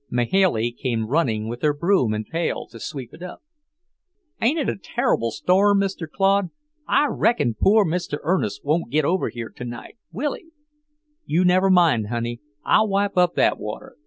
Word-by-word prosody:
Mahailey 120 - +1
came 120 -2 -2
running 110 -5 0
with 120 +2 -6
her 150 -1 +2
broom 170 - +2
and 110 0 -3
pail 165 +5 -3
to - - -11
sweep 135 -5 -7
it 160 - -14
up. 180 0 -9 1.0
"Ain't 255 +8 +2
it 295 - -1
a - - -1
turrible 115 - -1
storm, 200 - +3
Mr. 190 -5 -3
Claude? 195 +1 +1 0.4
I 295 - +3
reckon 160 - +1
poor 205 - +3
Mr. 170 -3 -2
Ernest 155 - -1
won't 155 -1 0
git 150 +3 +1
over 180 +5 0
tonight, 120 - -8
will 270 - -2
he? 330 - -12 0.8
You 175 +4 +2
never 185 +2 +4
mind, 165 - +4
honey; 120 +1 -4 0.2
I'll 220 - +4
wipe 200 0 0
up 180 -1 +3
that - - +2
water. - - -7
165 Hz, 165 wpm, -22 LUFS, 120-195 Hz, 1.0 s, never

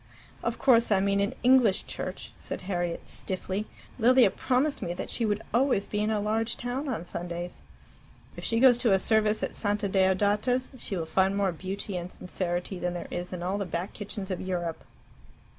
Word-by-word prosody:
"Of - - -2
course 235 -4 +4
I 195 - +5
mean 200 +1 +2
an 200 0 0
English 245 -6 +5
church," - - -6
said - - -5
Harriet 175 -2 -2
stiffly. 190 +2 -3 0.3
"Lilia 245 -2 +6
promised 270 +3 0
me 175 - -3
that - - -4
she 235 - 0
would 210 0 -1
always 240 -5 +3
be 210 - -3
in 210 +1 +1
a 215 -1 +1
large 220 +2 0
town 255 +4 -3
on 220 -9 -3
Sundays." 175 0 -5 0.7
"If - - -8
she 230 - +1
goes 245 -1 +6
to 235 -5 +3
a - - +6
service 215 +1 +2
at - - -2
Santa 205 -1 0
Deodata's, 205 +6 +2
she 195 - -3
will 165 - -2
find 190 +4 +2
more 195 -2 +2
beauty 190 +3 -4
and 175 +1 -5
sincerity 180 0 -3
than 180 0 -2
there 175 - -6
is 175 0 -4
in 180 -2 -5
all 190 +3 -1
the 200 - -1
Back 175 +2 -3
Kitchens 205 -2 -6
of 185 - -2
Europe." 175 -3 -3
200 Hz, 195 wpm, -28 LUFS, 185-225 Hz, 0.7 s, Lilia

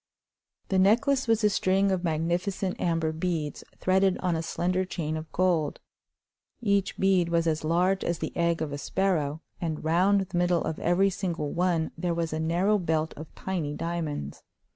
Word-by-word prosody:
The 190 - +2
necklace 245 +8 +3
was 225 -1 +2
a 210 - +5
string 195 +1 +2
of 185 -1 -1
magnificent 175 +4 -1
amber 165 -2 +1
beads 160 -2 -3
threaded 190 0 +2
on 180 -2 0
a 160 - -1
slender 180 +3 -1
chain 160 -4 -3
of 155 0 -6
gold. 170 -5 +1 0.8
Each 200 -4 0
bead 190 -3 +3
was 170 0 +1
as 160 -1 0
large 180 +4 +2
as 170 - -1
the - - -5
egg 170 -1 +1
of 145 -2 -4
a 145 - -4
sparrow, 160 -5 -1 0.2
and 160 -3 -3
round 185 +5 +3
the 180 -2 -4
middle 175 -1 +2
of 160 - -3
every 190 +3 +3
single 170 -6 -3
one 170 -2 +1
there 175 -1 0
was 165 -1 -2
a 155 - -2
narrow 180 +6 +2
belt 160 -2 0
of 155 +2 -8
tiny 165 -6 -3
diamonds. 160 - -4
175 Hz, 175 wpm, -27 LUFS, 160-190 Hz, 0.8 s, a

